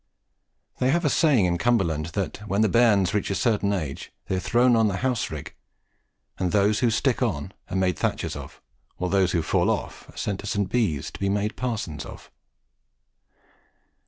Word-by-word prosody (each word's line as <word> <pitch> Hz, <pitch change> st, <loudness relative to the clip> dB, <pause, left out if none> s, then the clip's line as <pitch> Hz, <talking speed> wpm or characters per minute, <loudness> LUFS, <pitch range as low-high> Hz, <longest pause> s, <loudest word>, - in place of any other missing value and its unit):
They 125 Hz, -, +2 dB
have 170 Hz, +4 st, +1 dB
a 145 Hz, -, +3 dB
saying 140 Hz, -, +4 dB
in 85 Hz, -1 st, 0 dB
Cumberland 85 Hz, -9 st, +1 dB
that 100 Hz, -3 st, -2 dB
when 100 Hz, +2 st, +1 dB
the 110 Hz, -, +3 dB
bairns 105 Hz, -6 st, +4 dB
reach 105 Hz, -, 0 dB
a 100 Hz, -, 0 dB
certain 105 Hz, -1 st, +1 dB
age, 80 Hz, -9 st, -4 dB
they 95 Hz, -, -1 dB
are -, -, 0 dB
thrown 120 Hz, +6 st, +3 dB
on 110 Hz, -1 st, +4 dB
to 100 Hz, -, -1 dB
the -, -, -2 dB
house 125 Hz, -2 st, -1 dB
rigg, -, -, -7 dB, 0.9 s
and 90 Hz, -2 st, 0 dB
that -, -, +2 dB
those 105 Hz, +1 st, +3 dB
who 120 Hz, -, +3 dB
stick 120 Hz, +3 st, +1 dB
on 95 Hz, -, -1 dB, 0.2 s
are 95 Hz, -, -4 dB
made 90 Hz, -4 st, +1 dB
thatchers -, -, -1 dB
of, -, -, -10 dB, 0.3 s
while 90 Hz, 0 st, -2 dB
those 95 Hz, -3 st, +2 dB
who 85 Hz, -3 st, +1 dB
fall -, -, +1 dB
off -, -, -3 dB
are -, -, -16 dB
sent 100 Hz, -2 st, -2 dB
to 105 Hz, -, -7 dB
St. 100 Hz, -3 st, -1 dB
Bees 100 Hz, -, 0 dB
to -, -, -10 dB
be 100 Hz, -, 0 dB
made 105 Hz, +2 st, -1 dB
parsons 105 Hz, -, -3 dB
of. -, -, -12 dB
100 Hz, 200 wpm, -25 LUFS, 90-115 Hz, 0.9 s, saying